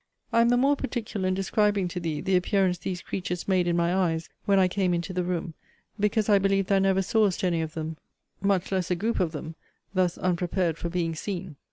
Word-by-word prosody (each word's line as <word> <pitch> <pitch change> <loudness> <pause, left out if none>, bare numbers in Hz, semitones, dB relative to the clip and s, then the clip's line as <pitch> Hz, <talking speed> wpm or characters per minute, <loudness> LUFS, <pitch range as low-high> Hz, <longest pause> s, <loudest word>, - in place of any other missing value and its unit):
I 230 - +5
am 235 - +4
the 245 - +4
more 275 +3 +4
particular 225 -8 -3
in 185 - +1
describing 200 0 +1
to 180 - -4
thee 160 -3 -3
the 190 0 +1
appearance 180 -1 +2
these 180 +1 -4
creatures 180 -2 -4
made 185 -2 +2
in 170 0 +1
my 170 +1 +2
eyes 165 -4 0 0.2
when 200 -1 +3
I 190 -1 +5
came 180 -1 +1
into 170 +2 -3
the 180 0 0
room, 175 -2 -3 0.5
because 210 +1 +1
I 205 -2 +5
believe 195 0 +2
thou 195 +1 +3
never 195 0 +2
sawest 205 -2 +1
any 170 -3 +1
of 160 0 -5
them, 160 0 -4 0.4
much 195 -2 +1
less 185 -2 0
a 180 - +2
group 220 +6 -1
of 175 -4 +1
them, 160 +1 -6 0.4
thus 185 -2 +1
unprepared 175 -2 0
for 170 - -3
being 170 -1 -1
seen. 180 -1 -5
185 Hz, 220 wpm, -27 LUFS, 175-195 Hz, 0.5 s, I